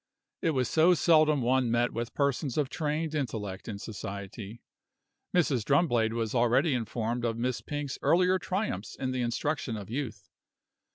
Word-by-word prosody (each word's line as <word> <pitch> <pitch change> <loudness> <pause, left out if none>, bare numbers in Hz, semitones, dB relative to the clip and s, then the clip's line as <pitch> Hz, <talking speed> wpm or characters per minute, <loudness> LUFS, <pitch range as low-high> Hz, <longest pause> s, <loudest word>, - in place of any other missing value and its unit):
It 160 -3 +1
was 125 -2 +2
so 165 +6 +5
seldom 155 -3 +4
one 125 0 +2
met 120 +1 +1
with 120 0 -4
persons 140 -1 0
of 145 -3 +1
trained 155 0 -2
intellect 105 -10 -3
in 105 -3 -4
society. 100 +1 -7 0.7
Mrs. 145 -10 +2
Drumblade 120 -5 +2
was 115 -2 -2
already 120 +5 +3
informed 120 0 -2
of 115 -1 -1
Miss 125 +1 -1
Pink's 145 -2 -4
earlier 185 +2 +3
triumphs 185 - -3
in 130 -1 -2
the 130 -1 -1
instruction 120 0 -1
of 105 0 -8
youth. 130 -2 -4
125 Hz, 155 wpm, -29 LUFS, 115-150 Hz, 0.7 s, so